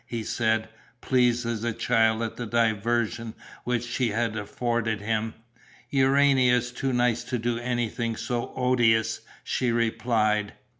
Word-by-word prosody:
he 115 Hz, -2 st, -4 dB
said, 110 Hz, 0 st, 0 dB, 0.3 s
pleased 120 Hz, -1 st, +2 dB
as 115 Hz, -2 st, -2 dB
a 120 Hz, -, 0 dB
child 115 Hz, -1 st, +2 dB
at 110 Hz, -, -4 dB
the 120 Hz, -, -5 dB
diversion 115 Hz, 0 st, 0 dB, 0.3 s
which 120 Hz, -1 st, -1 dB
she 120 Hz, 0 st, 0 dB
had 110 Hz, +1 st, -1 dB
afforded 115 Hz, +1 st, -2 dB
him. 110 Hz, +1 st, -1 dB, 0.6 s
"Urania 135 Hz, -2 st, +4 dB
is 125 Hz, 0 st, -3 dB
too 135 Hz, +2 st, -2 dB
nice 120 Hz, -1 st, +1 dB
to 125 Hz, -, -2 dB
do 120 Hz, 0 st, -1 dB
anything 120 Hz, -1 st, -2 dB
so 120 Hz, +1 st, -3 dB
odious," 120 Hz, -3 st, +2 dB, 0.2 s
she 125 Hz, -2 st, 0 dB
replied. 110 Hz, -3 st, +1 dB
120 Hz, 140 wpm, -26 LUFS, 110-125 Hz, 0.6 s, Urania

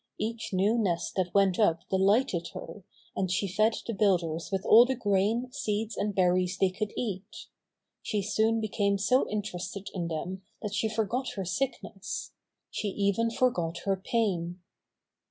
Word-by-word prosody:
Each 225 Hz, +2 st, -3 dB
new 200 Hz, +5 st, +2 dB
nest 175 Hz, -6 st, 0 dB
that 180 Hz, -2 st, 0 dB
went 195 Hz, -1 st, +3 dB
up 170 Hz, -4 st, +2 dB
delighted 190 Hz, -2 st, +2 dB
her, 205 Hz, -, -8 dB, 0.3 s
and 190 Hz, -1 st, 0 dB
she 185 Hz, +3 st, 0 dB
fed 215 Hz, +4 st, +2 dB
the 230 Hz, -, -3 dB
builders 175 Hz, -5 st, +1 dB
with 195 Hz, -1 st, -1 dB
all 230 Hz, +2 st, +9 dB
the 260 Hz, +2 st, 0 dB
grain, 220 Hz, +3 st, +1 dB
seeds 215 Hz, -1 st, -2 dB
and 205 Hz, -1 st, -2 dB
berries 180 Hz, 0 st, +2 dB
they 190 Hz, -1 st, +3 dB
could 210 Hz, +3 st, -3 dB
eat. 200 Hz, -3 st, -4 dB, 0.6 s
She 210 Hz, -2 st, -1 dB
soon 220 Hz, +2 st, +2 dB
became 205 Hz, -2 st, 0 dB
so 250 Hz, +7 st, +2 dB
interested 200 Hz, -1 st, -4 dB
in 175 Hz, -3 st, -2 dB
them 175 Hz, +4 st, -4 dB, 0.2 s
that 210 Hz, -1 st, -3 dB
she 220 Hz, +1 st, 0 dB
forgot 225 Hz, +4 st, -1 dB
her 195 Hz, -2 st, -3 dB
sickness. 195 Hz, 0 st, -3 dB, 0.4 s
She 215 Hz, -, -2 dB
even 200 Hz, +3 st, +1 dB
forgot 205 Hz, -10 st, 0 dB
her 195 Hz, -1 st, +2 dB
pain. 185 Hz, -4 st, -1 dB
200 Hz, 155 wpm, -29 LUFS, 185-220 Hz, 0.6 s, all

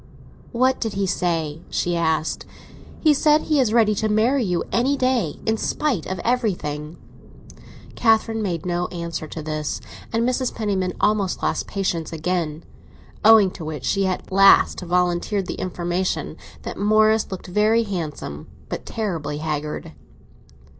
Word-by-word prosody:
"What 255 Hz, +2 st, +2 dB
did 225 Hz, -3 st, -1 dB
he 195 Hz, 0 st, 0 dB
say?" 165 Hz, -4 st, -1 dB
she 175 Hz, 0 st, -1 dB
asked. 160 Hz, -2 st, 0 dB, 0.6 s
"He 310 Hz, -2 st, +5 dB
said 300 Hz, +1 st, +4 dB
he 305 Hz, -2 st, +1 dB
is 245 Hz, -5 st, +2 dB
ready 220 Hz, -2 st, +4 dB
to 215 Hz, +1 st, -1 dB
marry 235 Hz, +5 st, +2 dB
you 180 Hz, -4 st, 0 dB
any 265 Hz, +4 st, +2 dB
day, 255 Hz, -, 0 dB
in 220 Hz, 0 st, +1 dB
spite 255 Hz, -, -1 dB
of 190 Hz, -, -3 dB
everything." 175 Hz, -, -1 dB, 1.0 s
Catherine 225 Hz, -1 st, +2 dB
made 175 Hz, -6 st, -2 dB
no 175 Hz, 0 st, -1 dB
answer 170 Hz, -2 st, -5 dB
to 155 Hz, 0 st, -7 dB
this, 150 Hz, -9 st, -3 dB, 0.3 s
and 230 Hz, +1 st, +1 dB
Mrs. 255 Hz, 0 st, -1 dB
Penniman 195 Hz, -5 st, -1 dB
almost 210 Hz, -3 st, +1 dB
lost -, -, -1 dB
patience 175 Hz, -5 st, -2 dB
again; 165 Hz, -1 st, -2 dB, 0.6 s
owing 215 Hz, -3 st, +7 dB
to 170 Hz, -, -9 dB
which 155 Hz, -4 st, -5 dB
she 195 Hz, -1 st, +1 dB
at 185 Hz, 0 st, -3 dB
last 195 Hz, +1 st, +6 dB
volunteered 180 Hz, +2 st, 0 dB
the -, -, -5 dB
information 180 Hz, +1 st, -2 dB, 0.3 s
that -, -, -6 dB
Morris 215 Hz, +1 st, +3 dB
looked 190 Hz, -, -6 dB
very 215 Hz, +5 st, +2 dB
handsome, 155 Hz, -, -5 dB, 0.2 s
but -, -, -5 dB
terribly 165 Hz, -9 st, -3 dB
haggard. 150 Hz, -, -4 dB
190 Hz, 145 wpm, -22 LUFS, 165-220 Hz, 1.0 s, owing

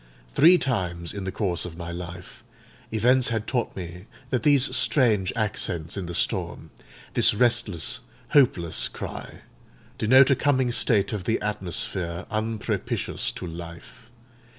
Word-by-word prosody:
Three 170 Hz, +5 st, +6 dB
times 90 Hz, -, -2 dB
in 100 Hz, -2 st, -6 dB
the 95 Hz, -, -3 dB
course 90 Hz, -5 st, -2 dB
of 85 Hz, -2 st, -8 dB
my 85 Hz, -1 st, -6 dB
life, 90 Hz, +1 st, -9 dB, 0.5 s
events 125 Hz, +4 st, +3 dB
had 110 Hz, -2 st, -2 dB
taught 120 Hz, -1 st, -2 dB
me 90 Hz, +1 st, -8 dB, 0.2 s
that 125 Hz, -, 0 dB
these 140 Hz, -2 st, +3 dB
strange 110 Hz, -9 st, +2 dB
accents 95 Hz, -7 st, -1 dB
in 95 Hz, -3 st, -5 dB
the 85 Hz, -, -5 dB
storm—this -, -, 0 dB
restless, 120 Hz, -2 st, +2 dB, 0.3 s
hopeless 105 Hz, -, +2 dB
cry—denote 130 Hz, +5 st, -1 dB
a -, -, +5 dB
coming 130 Hz, -2 st, +1 dB
state 110 Hz, -4 st, +2 dB
of 100 Hz, -4 st, -5 dB
the 115 Hz, -, 0 dB
atmosphere 90 Hz, -3 st, -3 dB
unpropitious 110 Hz, 0 st, -2 dB
to -, -, -7 dB
life. 85 Hz, +7 st, -10 dB
105 Hz, 130 wpm, -24 LUFS, 85-120 Hz, 0.5 s, Three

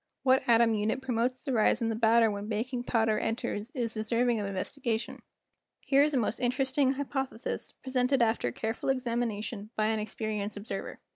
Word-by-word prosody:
What 260 Hz, 0 st, +4 dB
atom 230 Hz, -1 st, +5 dB
unit 215 Hz, +4 st, 0 dB
promotes 255 Hz, -1 st, -1 dB
the 275 Hz, -3 st, -2 dB
rise 220 Hz, 0 st, +3 dB
in 230 Hz, -2 st, 0 dB
the 225 Hz, -, -1 dB
batter 225 Hz, 0 st, +4 dB
when 205 Hz, 0 st, -5 dB
baking 240 Hz, +3 st, -2 dB
powder 225 Hz, -3 st, +2 dB
en¬ 225 Hz, -, -1 dB
ters 210 Hz, 0 st, -4 dB
is 235 Hz, -3 st, -1 dB
deserving 230 Hz, +2 st, +1 dB
of 205 Hz, -, -2 dB
investigation. 225 Hz, +4 st, -3 dB, 0.6 s
Here 275 Hz, 0 st, +3 dB
is 295 Hz, 0 st, +2 dB
a -, -, +3 dB
most 230 Hz, -1 st, 0 dB
interesting 260 Hz, +2 st, +1 dB
hy¬ 285 Hz, +1 st, -2 dB
pothesis 265 Hz, -4 st, -4 dB
presented 260 Hz, 0 st, +1 dB
after 225 Hz, -, +2 dB
careful 220 Hz, -, -3 dB
examination 235 Hz, -4 st, -2 dB
by 215 Hz, 0 st, +1 dB
an 220 Hz, -1 st, 0 dB
experienced 215 Hz, -1 st, -3 dB
observer. 205 Hz, +3 st, -6 dB
230 Hz, 180 wpm, -29 LUFS, 215-255 Hz, 0.6 s, atom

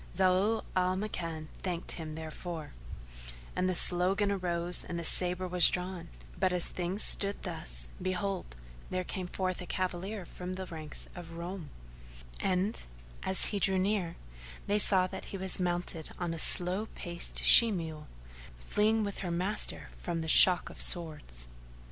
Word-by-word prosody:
Zau 190 Hz, +4 st, +2 dB
al 185 Hz, 0 st, +1 dB
Makan 165 Hz, -6 st, -5 dB
thanked 180 Hz, -2 st, -3 dB
him 155 Hz, -2 st, -6 dB
therefor, 160 Hz, 0 st, -7 dB, 0.8 s
and 185 Hz, 0 st, 0 dB
the 185 Hz, -, 0 dB
slogan 190 Hz, +4 st, +4 dB
arose 175 Hz, -2 st, 0 dB
and 170 Hz, -, -6 dB
the 170 Hz, -, -4 dB
sabre 180 Hz, +2 st, +2 dB
was 180 Hz, -1 st, +5 dB
drawn; 180 Hz, -1 st, -4 dB, 0.3 s
but, 185 Hz, -, +2 dB
as 180 Hz, -1 st, +2 dB
things 180 Hz, +3 st, -1 dB
stood 200 Hz, 0 st, +3 dB
thus, 170 Hz, -3 st, -2 dB
behold, 185 Hz, -, -3 dB, 0.3 s
there 185 Hz, 0 st, -2 dB
came 185 Hz, 0 st, -5 dB
forth 185 Hz, 0 st, -3 dB
a 180 Hz, -, -8 dB
cavalier 185 Hz, +1 st, -4 dB
from 180 Hz, +2 st, -7 dB
the 190 Hz, 0 st, -6 dB
ranks 155 Hz, -4 st, -9 dB
of 170 Hz, -2 st, -10 dB
Roum; 170 Hz, -1 st, -7 dB, 0.7 s
and, 190 Hz, +3 st, -1 dB, 0.4 s
as 190 Hz, -, -1 dB
he 205 Hz, -, -2 dB
drew 190 Hz, 0 st, +4 dB
near, 185 Hz, -3 st, -1 dB, 0.5 s
they 205 Hz, +1 st, +1 dB
saw 190 Hz, -3 st, +6 dB
that 185 Hz, -, -7 dB
he 195 Hz, -, -7 dB
was 190 Hz, 0 st, +1 dB
mounted 175 Hz, -3 st, -3 dB
on 175 Hz, -2 st, -3 dB
a 165 Hz, -, -3 dB
slow 185 Hz, +7 st, +3 dB
paced 170 Hz, 0 st, -3 dB
she 230 Hz, -1 st, +9 dB
mule, 160 Hz, -5 st, -6 dB, 0.5 s
fleeing 215 Hz, -, +1 dB
with 200 Hz, -1 st, -5 dB
her 180 Hz, -, -4 dB
master 180 Hz, +5 st, -1 dB
from 170 Hz, -2 st, -3 dB
the 160 Hz, -, -5 dB
shock 175 Hz, +1 st, +7 dB
of -, -, -7 dB
swords. 150 Hz, -, -1 dB
180 Hz, 155 wpm, -30 LUFS, 170-190 Hz, 0.8 s, she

